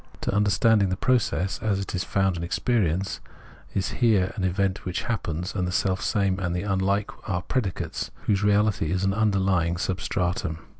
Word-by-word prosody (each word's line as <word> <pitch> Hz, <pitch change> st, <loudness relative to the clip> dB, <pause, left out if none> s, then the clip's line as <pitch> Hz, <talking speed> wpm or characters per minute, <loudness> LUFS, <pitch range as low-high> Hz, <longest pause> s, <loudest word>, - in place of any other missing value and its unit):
To -, -, -1 dB
understanding 105 Hz, 0 st, +3 dB
the 95 Hz, -, -1 dB
process, 105 Hz, -6 st, +1 dB
as 105 Hz, -3 st, 0 dB
it 100 Hz, -, -5 dB
is 90 Hz, -, -1 dB
found 95 Hz, -2 st, +1 dB
in 85 Hz, -, -4 dB
experience, 95 Hz, -1 st, 0 dB, 0.5 s
is 95 Hz, -, 0 dB
here 105 Hz, -6 st, +3 dB
an 95 Hz, -, -3 dB
event 95 Hz, +1 st, 0 dB
that 90 Hz, -1 st, -3 dB
happens, 90 Hz, -5 st, -2 dB
and 90 Hz, -3 st, -1 dB
the -, -, -2 dB
selfsame 95 Hz, +1 st, +1 dB
and 85 Hz, -2 st, -1 dB
the 90 Hz, -, -2 dB
unhke 100 Hz, +1 st, 0 dB, 0.2 s
are 90 Hz, -2 st, -1 dB
predicates, 105 Hz, -7 st, -2 dB
whose 100 Hz, -2 st, +1 dB
reality 105 Hz, -5 st, +2 dB
is 90 Hz, +1 st, 0 dB
an 95 Hz, 0 st, +2 dB
underlying 95 Hz, -5 st, +1 dB
sub 95 Hz, +1 st, -2 dB
stratum. 85 Hz, -3 st, -1 dB
95 Hz, 170 wpm, -25 LUFS, 90-105 Hz, 0.5 s, understanding